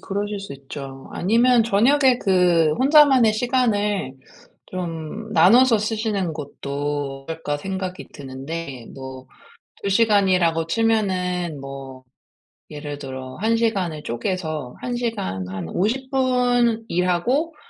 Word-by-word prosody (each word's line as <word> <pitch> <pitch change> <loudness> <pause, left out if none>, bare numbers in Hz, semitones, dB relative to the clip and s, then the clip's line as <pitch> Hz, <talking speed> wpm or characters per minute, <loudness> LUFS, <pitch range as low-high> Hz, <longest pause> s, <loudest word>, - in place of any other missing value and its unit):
그러실 205 +1 -3
수 195 -6 -8
있죠. 135 0 -9
아니면 235 +5 +3
'저녁에 250 +4 +4
그 175 -4 +3
혼자만의 270 -4 +6
시간을 215 - 0 0.6
좀 180 +4 -5
나눠서 225 +7 +6
쓰시는 215 -4 -1
것도 145 -1 -4
어떨까.' 160 -2 -3
생각이 185 +2 -5
드는데 135 -1 -7
뭐 130 -1 -9 0.6
2 200 - 0
시간이라고 190 -6 +3
치면은 185 -7 0
뭐 135 -1 -9 0.7
예를 145 -1 -7
들어 130 -2 -7
1 225 +3 +1
시간을 190 -9 -1
쪼개서 155 +1 -3
1 245 -1 -3
시간 205 - -3
한 95 -3 -5
50 245 - -1
분 245 -3 +2
일하고 210 - 0
185 Hz, 220 characters per minute, -22 LUFS, 145-225 Hz, 0.7 s, 혼자만의